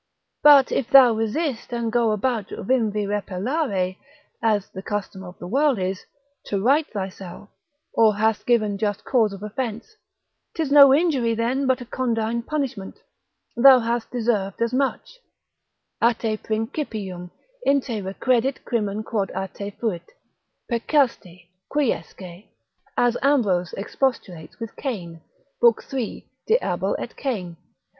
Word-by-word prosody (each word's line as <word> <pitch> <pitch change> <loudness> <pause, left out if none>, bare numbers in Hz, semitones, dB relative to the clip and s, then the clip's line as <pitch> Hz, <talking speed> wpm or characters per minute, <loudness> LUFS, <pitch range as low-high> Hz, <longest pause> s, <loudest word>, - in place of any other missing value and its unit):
But 285 -3 +7
if 245 - -1
thou 260 -4 +8
resist 225 +4 -2
and 235 -1 -2
go 235 -1 +2
about 215 0 -1
vim 230 0 0
vi 210 0 -2
repellere, 200 - -2 0.4
as 215 -3 +1
the 190 - -7
custom 195 -2 -5
of 180 -1 -11
the - - -9
world 275 +6 +2
is, 185 0 -3 0.4
to 200 - -2
right 280 +9 +3
thyself, 195 -1 -7 0.4
or 220 -2 +4
hast 220 +1 0
given 215 -4 +2
just 205 -2 -2
cause 230 -6 +2
of 200 0 -9
offence, 235 - -5 0.6
'tis 315 -4 -2
no 280 -2 +9
injury 270 -7 +2
then 250 +4 0
but 260 -1 +1
a - - -7
condign 235 -2 -1
punishment; 245 -7 -4 0.6
thou 260 +2 +8
hast 235 -1 -2
deserved 220 -5 -1
as 230 +1 0
much: 275 - -2 0.8
A 235 0 +4
te 220 -1 -2
principium, 215 - -4 0.3
in 280 0 +3
te 235 -5 -4
recredit 245 +7 0
crimen 215 -2 -1
quod 205 -3 -2
a 190 0 -3
te 200 +1 -7
fuit; 205 - -4 0.6
peccasti, 230 - -1 0.2
quiesce, 190 - -3 0.5
as 245 0 +2
Ambrose 205 - +2
expostulates 195 - -3
with 230 -1 -7
Cain, 175 - -5 0.4
lib. 475 -1 +5
3. 260 -5 -5 0.2
de 445 - +5
Abel - - -1
et - - -7
Cain. 190 -11 -4
225 Hz, 135 wpm, -23 LUFS, 200-260 Hz, 0.8 s, no